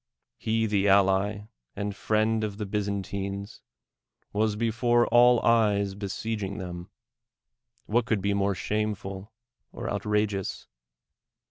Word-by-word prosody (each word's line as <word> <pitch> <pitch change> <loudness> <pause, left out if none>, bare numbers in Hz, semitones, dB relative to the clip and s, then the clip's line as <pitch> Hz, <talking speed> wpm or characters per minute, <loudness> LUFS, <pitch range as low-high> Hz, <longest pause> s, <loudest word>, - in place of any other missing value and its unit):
He, 115 0 0
the 100 -2 +1
ally 100 +1 +3 0.3
and 100 0 -3
friend 110 +1 +1
of 105 -2 -3
the 105 - -3
Byzantines, 100 0 -3 0.7
was 105 0 +1
before 120 +2 +2
all 120 0 +6
eyes 105 -4 +3
besieging 100 0 -4
them 90 -2 -7 0.5
— 120 0 -46
what 115 +2 +1
could 110 -4 +1
be 100 +1 0
more 100 0 +1
shameful 105 -1 -3 0.4
or - - -6
outra 105 0 +1
geous? 100 -3 -5
105 Hz, 120 wpm, -27 LUFS, 100-110 Hz, 0.7 s, all